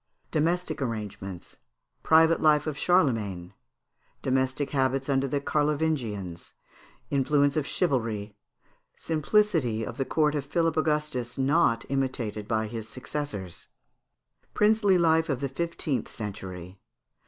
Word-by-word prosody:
Domestic 160 0 0
Arrangements. 105 -6 -5 0.4
Private 160 +1 +5
Life 150 -1 +4
of 155 -2 -2
Charlemagne. 110 - +1 0.7
Domestic 130 +2 0
Habits 135 -1 0
under 135 0 +2
the 140 +2 0
Carlovingians. 140 - -1 0.6
Influence 140 0 +2
of 155 -3 0
Chivalry. 110 - -1 0.6
Simplicity 155 - +1
of - - -7
the 135 - -1
Court 150 0 +2
of 145 -2 -1
Philip 165 +3 0
Angustus 150 -6 -1
not 135 -3 +2
imitated 125 -6 -2
by 110 -1 0
his 110 0 -6
Successors. 130 - -6 0.9
Princely 210 -2 +4
Life 160 -1 +3
of 135 -4 0
the 140 - -1
Fifteenth 160 -1 -2
Century. 95 -4 -7
135 Hz, 110 wpm, -27 LUFS, 110-155 Hz, 0.9 s, Private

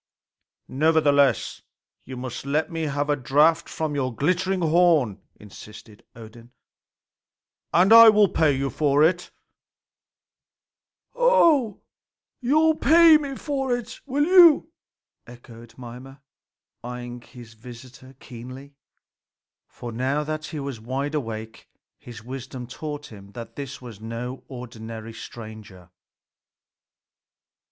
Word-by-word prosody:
"Nevertheless, 145 -4 +1 0.4
you 130 0 -9
must 125 -1 -7
let 150 +5 -2
me 165 -1 -3
have 145 0 -2
a 145 - +1
draught 150 +5 +2
from 155 -2 -4
your 130 -3 -2
glittering 180 +8 -1
horn," 160 - +2
insisted 105 +1 -14
Odin, 115 +1 -14 1.2
"and 185 +5 +4
I 230 0 +10
will 210 -1 +4
pay 160 -4 +1
you 135 0 -2
for 145 +2 +2
it." 175 +2 +1 1.8
"Oho, 340 - +3 0.6
you 265 +4 +1
will 315 0 +3
pay 325 +1 +6
me 280 -2 -6
for 270 -4 -2
it, 240 -1 -10
will 285 +2 0
you?" 340 -3 +6 0.6
echoed 120 -1 -15
Mimer, 130 +3 -11 0.6
eyeing 120 0 -8
his 120 -2 -14
visitor 125 +3 -14
keenly. 130 +3 -11 0.9
For 120 - -9
now 130 +6 -1
that 155 0 -5
he 155 -1 -6
was 140 -4 -6
wide 135 +6 -4
awake, 110 -6 -6 0.3
his 115 -3 -12
wisdom 130 0 -8
taught 145 +3 -8
him 100 -1 -14
that 115 -1 -10
this 140 -2 -8
was 115 -4 -11
no 115 +3 -7
ordinary 115 -3 -9
stranger. 110 -6 -11
135 Hz, 115 wpm, -23 LUFS, 120-165 Hz, 1.8 s, I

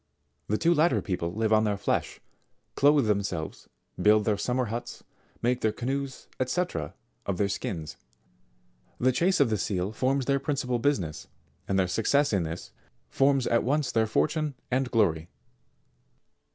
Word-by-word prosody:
The 105 - +1
two 170 +6 +3
latter 165 +2 +3
people 90 -3 -3
live 110 0 +1
on 110 0 +4
their 105 -2 0
flesh, - - -1 0.5
clothe 145 -2 +4
themselves, 100 -7 -2 0.3
build 105 0 +5
their 105 - +2
summer 125 +5 -1
huts, 115 +2 -6 0.4
make 125 +1 +1
their 110 - +2
canoes, 135 +4 -4 0.2
&c. 175 +8 0 0.6
of 100 -3 -1
their 100 - +2
skins. 80 -5 -4 1.0
The 130 +1 +3
chase 175 +9 +2
of 135 -5 +3
the 105 - 0
seal 95 0 -1
forms 130 +4 0
their 140 +1 +2
principal 130 -3 -1
busi 145 -2 +2
ness, 80 -3 -7 0.4
and 95 - 0
their 95 -1 +2
success 115 +9 +2
in 100 - +2
this, 80 +1 -5 0.4
forms 135 -1 +3
at 115 - +2
once 145 +3 0
their 110 -1 +2
fortune 150 +5 0 0.2
and 130 0 +1
glory. 85 -9 +1
115 Hz, 155 wpm, -27 LUFS, 100-140 Hz, 1.0 s, build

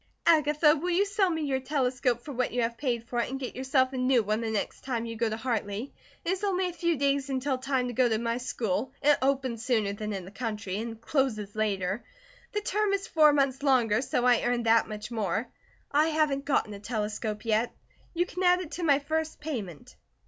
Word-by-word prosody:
"Agatha, 300 -1 +5
will 335 +4 -3
you 365 +3 +3
sell 400 -1 +1
me 320 -2 -1
your 270 -2 0
telescope 255 -3 0
for 290 - -8
what 255 -2 -1
you 240 -1 +1
paid 235 -2 -2
for 240 +1 -3
it, 235 - 0
and 270 +1 -4
get 255 - -5
yourself 260 0 +1
a - - -3
new 255 -2 +3
one 215 +2 0
the 225 - -2
next 215 -2 -3
time 240 -3 -2
you 230 0 -5
go 230 0 0
to 220 - -3
Hartley? 225 0 -3 0.3
It 345 - +1
is 380 +1 -2
only 375 -2 +1
a 355 - -5
few 340 -1 0
days 280 0 +1
until 265 0 -1
time 265 -1 0
to 245 - -4
go 245 +1 +3
to 220 - +1
my 235 +1 -1
school, 240 0 -2
it 295 0 +5
opens 260 -4 0
sooner 220 -5 +1
than 210 +1 -4
in 190 -3 -4
the 190 - -11
country, 210 -3 -4
and 225 0 -5
closes 230 -7 -1
later. 200 -1 -1 0.5
The 420 - -1
term 415 0 0
is 395 0 -1
four 305 -2 +5
months 275 -2 +1
longer, 250 -6 +3
so 250 -2 0
I 245 -2 +5
earn 240 0 0
that 230 0 +4
much 210 +1 -7
more. 220 0 -1 0.4
I 300 +2 +4
haven't 305 -3 +1
gotten 260 -7 +1
a 200 - -8
telescope 210 0 -3
yet. 225 +1 +1 0.4
You 350 +1 +2
can 360 +1 -6
add 360 0 +5
it 355 -4 -6
to 355 - -4
my 285 -4 +5
first 315 +2 -2
payment." 220 - -6
255 Hz, 220 wpm, -28 LUFS, 225-295 Hz, 0.5 s, Agatha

